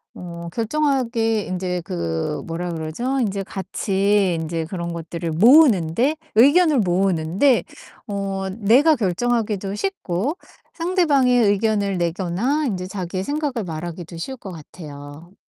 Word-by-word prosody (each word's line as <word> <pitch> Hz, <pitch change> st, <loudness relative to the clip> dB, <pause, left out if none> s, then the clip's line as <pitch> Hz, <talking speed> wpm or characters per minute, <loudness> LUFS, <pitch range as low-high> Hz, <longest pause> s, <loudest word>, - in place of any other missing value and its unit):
어 170 Hz, -1 st, -8 dB
결정하게 230 Hz, -4 st, 0 dB
인제 180 Hz, -1 st, -3 dB
그 85 Hz, -, -3 dB
뭐라 170 Hz, +1 st, -4 dB
그러죠? 170 Hz, +13 st, -2 dB
인제 200 Hz, -4 st, -1 dB
같이 195 Hz, 0 st, 0 dB
인제 160 Hz, 0 st, -3 dB
그런 170 Hz, 0 st, -5 dB
것들을 170 Hz, 0 st, -5 dB
모으는데 230 Hz, -, +5 dB, 0.2 s
의견을 290 Hz, +5 st, +5 dB
모으는데 190 Hz, -, +2 dB, 0.4 s
어 195 Hz, -2 st, -3 dB
내가 235 Hz, +10 st, +4 dB
결정하기도 210 Hz, -2 st, -1 dB
쉽고, 280 Hz, -, -2 dB, 0.4 s
상대방의 295 Hz, -9 st, +3 dB
의견을 205 Hz, -1 st, +1 dB
내거나 185 Hz, -, -1 dB
인제 185 Hz, -6 st, -3 dB
자기의 185 Hz, -1 st, -4 dB
생각을 285 Hz, -3 st, -2 dB
말하기도 170 Hz, +1 st, -6 dB
쉬울 265 Hz, +11 st, -5 dB
것 195 Hz, -5 st, -9 dB
같아요. 150 Hz, 0 st, -11 dB
195 Hz, 285 characters per minute, -21 LUFS, 170-245 Hz, 0.4 s, 모으는데